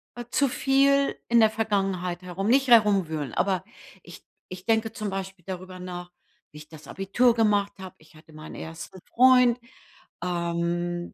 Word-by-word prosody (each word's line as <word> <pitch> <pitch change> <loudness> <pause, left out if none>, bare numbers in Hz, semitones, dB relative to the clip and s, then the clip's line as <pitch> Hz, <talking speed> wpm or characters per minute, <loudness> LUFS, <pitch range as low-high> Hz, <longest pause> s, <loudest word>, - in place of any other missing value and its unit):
äh, 240 0 -7
zu 280 - +2
viel 275 +1 +2
in 235 - +5
der 220 - +5
Vergangenheit 195 -5 -2
herum. 180 +2 -4
Nicht 265 +3 +3
herumwühlen, 190 - +3
aber 190 -1 0 0.4
ich - - -13 0.3
ich 185 0 -9
denke 225 -1 +1
zum 215 -3 -4
Beispiel 190 -2 -6
darüber 185 -1 -7
nach, 180 -1 -8 0.4
wie 150 - -13
ich 150 0 -14
das 155 -1 -13
Abitur 230 +5 +1
gemacht 205 -3 +1
habe. 190 -1 -9
Ich 155 0 -22
hatte 155 +1 -18
meinen 155 0 -10
1. 165 +3 -9
Freund. 250 -1 +5 0.6
Ähm, 175 0 -2
190 Hz, 155 wpm, -25 LUFS, 175-225 Hz, 0.6 s, in